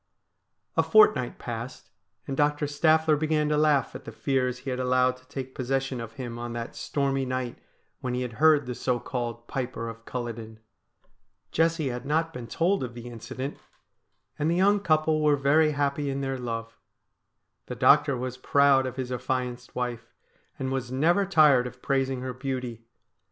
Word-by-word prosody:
A - - +5
fortnight 425 -1 +4
passed, - - -7 0.3
and 135 - -3
Doctor 150 +1 +1
Staffler 155 +2 +3
began 150 0 +1
to 150 - +2
laugh 150 -4 +3
at - - -8
the 115 - -8
fears 125 +1 0
he 130 +1 -5
had 125 - -3
allowed 125 0 +2
to 130 0 -23
take 130 -1 -6
possession 135 -1 -2
of 115 -1 -8
him 120 -3 -6
on 120 0 -5
that 115 -1 -5
stormy 135 -1 -1
night 130 -2 -3 0.4
when 125 -1 -3
he 125 - -1
had 125 -2 -5
heard 155 -3 +6
the 125 - -4
so 125 0 -1
called 120 -2 -4
Piper 125 -3 -4
of 115 0 -8
Culloden. 115 -3 -6 0.9
Jessie 165 -3 +1
had 125 0 -5
not 160 +3 0
been 120 -4 -7
told 175 +6 +1
of 120 -2 -6
the 120 0 -8
incident, 130 +4 -6 0.8
and 150 +2 +1
the 170 - +2
young 200 +3 +4
couple 155 -4 +2
were 150 -1 +4
very 150 +3 +3
happy 140 0 0
in 135 0 -2
their 135 -1 -2
love. 115 -1 -5 0.9
The - - -5
doctor 145 -2 +5
was 125 0 -4
proud 135 0 +4
of 130 - -6
his 130 -1 -4
affianced 125 0 -3
wife, 120 -2 -3 0.5
and 130 0 -3
was 130 -2 -3
never 170 +9 +2
tired 150 -8 +5
of 125 0 -11
praising 135 -1 0
her 130 0 -4
beauty. 125 -3 -5
130 Hz, 175 wpm, -27 LUFS, 125-150 Hz, 0.9 s, heard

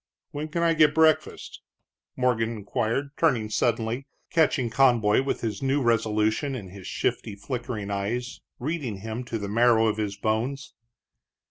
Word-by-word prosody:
"When 150 +2 -4
can 170 +2 -2
I 165 -1 +4
get 155 -2 +4
breakfast?" 160 -1 +1 0.5
Morgan 120 -3 +1
inquired, 115 +6 -2
turning 120 -10 +1
suddenly, 115 +3 0 0.2
catching 145 -7 +2
Conboy 115 -3 +4
with 135 - -2
his 110 -4 -3
new 135 +1 +1
resolution 115 +2 +1
in 100 -7 -7
his 95 0 -10
shifty, - - -2
flickering 115 -2 -5
eyes, 115 +6 -3 0.2
reading 130 - -4
him 110 +3 -5
to 120 -1 -3
the 100 -2 -5
marrow 115 +1 +4
of 110 -1 +1
his 105 -2 -3
bones. 115 +6 -2
115 Hz, 145 wpm, -26 LUFS, 110-135 Hz, 0.5 s, I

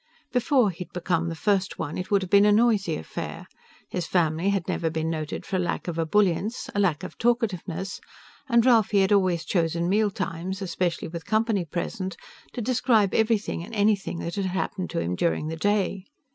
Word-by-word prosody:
Before 250 -3 +3
he'd 180 +1 -9
become 170 -2 0
the 165 - -4
First 195 +4 0
One, 155 -1 -4
it 185 - -4
would 200 -2 +3
have 185 - -7
been 200 0 +7
a - - +5
noisy 210 -6 +3
affair. 80 - -6 0.5
His 175 -3 -2
family 170 +1 +1
had 195 -4 0
never 165 - 0
been 160 0 -2
noted 155 -2 -4
for 190 - -1
a - - 0
lack 175 0 -2
of 165 -1 -3
ebullience, 200 +5 +1
a 205 - -1
lack 175 -7 +1
of - - -8
talkativeness, 195 -6 -1 0.5
and 235 -1 +4
Ralphie 220 -5 +4
had 190 - +2
always 185 -4 +2
chosen 170 -1 0
mealtimes 190 -2 -1
especially 180 -2 -2
with 165 0 -7
company 215 -4 +1
present 185 +4 -4 0.4
to 245 - -4
describe 225 -4 +2
everything 220 -6 +1
and 225 +6 -8
anything 205 -3 +1
that 170 - -4
had 200 -1 -1
happened 185 0 -2
to - - -2
him 85 +1 -1
during 155 - 0
the 160 - -3
day. 195 +1 0
190 Hz, 185 wpm, -26 LUFS, 170-210 Hz, 0.5 s, been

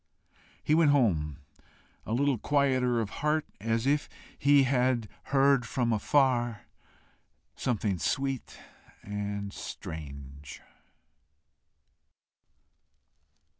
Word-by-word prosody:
He 150 - +2
went 160 -1 +5
home 85 - +2 0.7
a 110 - -2
little 135 -1 +1
quieter 130 -3 +2
of 105 -2 -4
heart, 150 +1 +1
as 115 +3 -1
if 145 +2 +1 0.3
he 140 0 +5
had 125 -3 +1 0.2
heard 135 -1 +3
from 120 -2 0
afar 120 0 +1 0.9
something 105 -6 -1
sweet 135 - -2 0.5
and 100 -1 -4
strange. 70 -3 -8
120 Hz, 85 wpm, -29 LUFS, 100-140 Hz, 0.9 s, went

